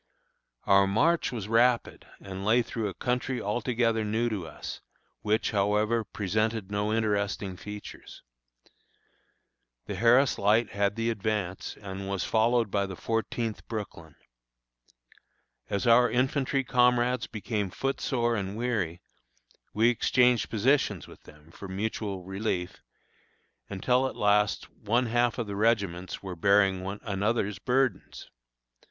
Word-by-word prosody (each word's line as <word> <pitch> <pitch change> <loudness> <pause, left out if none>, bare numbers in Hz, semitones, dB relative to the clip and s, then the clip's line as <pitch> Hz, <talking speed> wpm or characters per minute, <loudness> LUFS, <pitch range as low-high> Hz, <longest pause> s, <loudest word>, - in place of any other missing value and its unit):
Our 100 -1 +5
march 160 +13 +2
was 110 -5 -5
rapid 120 +2 +2
and 95 -1 -7
lay 115 +4 +3
through 110 -2 -3
a - - -7
country 125 +1 -1
altogether 115 +1 0
new 110 +3 0
to 100 -7 -4
us, - - -8 0.4
which, 110 +1 0
however, 105 +2 +1
presented 110 0 -2
no 105 0 0
very 110 +1 +1
interesting 100 -3 -1
features. 105 +2 -10 1.6
The - - -5
Harris 120 +4 +4
Light 105 +3 +3
had 100 0 0
the 115 0 0
advance, 105 -4 -3
and 95 -1 -6
was 100 -3 -1
followed 115 -1 +2
by 100 -1 0
the 95 - -7
Fourteenth 115 +1 -3
Brooklyn. 95 -8 -7 1.5
As 100 +2 -1
our 120 +1 +6
infantry 135 +1 +1
comrades 125 0 +2
became 105 -2 -3
foot 135 +9 -3
sore 120 -3 0
and 100 0 -4
weary, 100 -8 -2 0.7
we 115 +3 +3
exchanged 125 -1 +2
positions 110 - +1
with - - -15
them, 75 +2 -17
for 100 - -9
mutual 100 0 -3
relief, 95 -1 -3 0.9
until 125 +7 +1
at - - -7
last 105 0 +2
one 115 +4 0
half 120 +1 +1
of 120 - -2
the 100 -1 -5
regiments 100 -5 0
were 95 -2 -5
bearing 100 +1 +3
one 95 +2 -5
another's 105 -2 -1
burdens. 125 -6 -1
110 Hz, 130 wpm, -28 LUFS, 100-120 Hz, 1.6 s, our